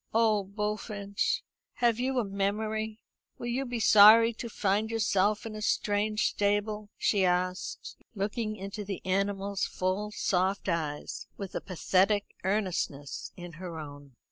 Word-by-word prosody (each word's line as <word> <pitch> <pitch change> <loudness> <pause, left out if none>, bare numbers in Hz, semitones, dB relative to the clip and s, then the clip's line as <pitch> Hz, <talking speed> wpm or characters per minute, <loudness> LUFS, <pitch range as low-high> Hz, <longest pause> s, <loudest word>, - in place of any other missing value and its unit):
"Oh, 220 -3 +4
Bullfinch, 205 0 -2 0.3
have 240 -2 +2
you 260 +1 0
a 245 - +3
memory? 215 +2 -2 0.4
Will - - -7
you 245 +3 -1
be 240 -1 -3
sorry 220 +2 +8
to 235 +1 -6
find 210 +1 0
yourself 210 -2 +1
in 225 - -5
a 215 - -6
strange 210 +1 +1
stable?" 205 +1 -1
she 200 -3 +2
asked, 180 0 -1 0.2
looking 215 +2 -2
into 200 +1 -6
the 195 -2 -5
animal's 195 +1 0
full 185 +3 -1
soft 190 -1 0
eyes 155 -4 -3
with 195 -2 -6
a - - -3
pathetic 195 +3 +1
earnestness 185 -8 -2
in 175 -1 -8
her 175 -3 -6
own. 145 -3 -10
205 Hz, 140 wpm, -29 LUFS, 190-215 Hz, 0.4 s, sorry